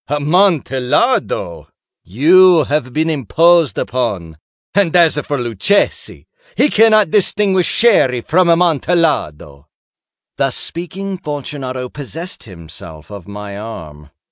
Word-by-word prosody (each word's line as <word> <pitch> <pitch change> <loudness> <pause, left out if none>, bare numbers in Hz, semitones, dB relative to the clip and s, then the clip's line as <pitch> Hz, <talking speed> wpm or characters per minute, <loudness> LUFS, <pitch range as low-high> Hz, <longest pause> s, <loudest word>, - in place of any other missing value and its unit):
Amontillado! 145 - 0 0.4
You 165 - +4
have 140 -2 -2
been 155 +4 -1
imposed 160 - +2
upon. 100 -11 -3 0.4
And 195 -4 +1
as 170 -3 +4
for 145 -1 -4
Luchesi, 120 - -1 0.3
he 295 - +2
cannot 215 -5 +3
distinguish 195 -2 +1
Sherry 135 - +2
from 175 +8 +1
Amontillado." 160 - 0 0.7
Thus - - 0
speaking, 185 +3 -5
Fortunato 140 -5 -6
possessed 150 +7 -9
himself 80 -3 -12
of 100 -4 -10
my 100 0 -8
arm. 75 -9 -10
145 Hz, 100 wpm, -15 LUFS, 110-175 Hz, 0.7 s, You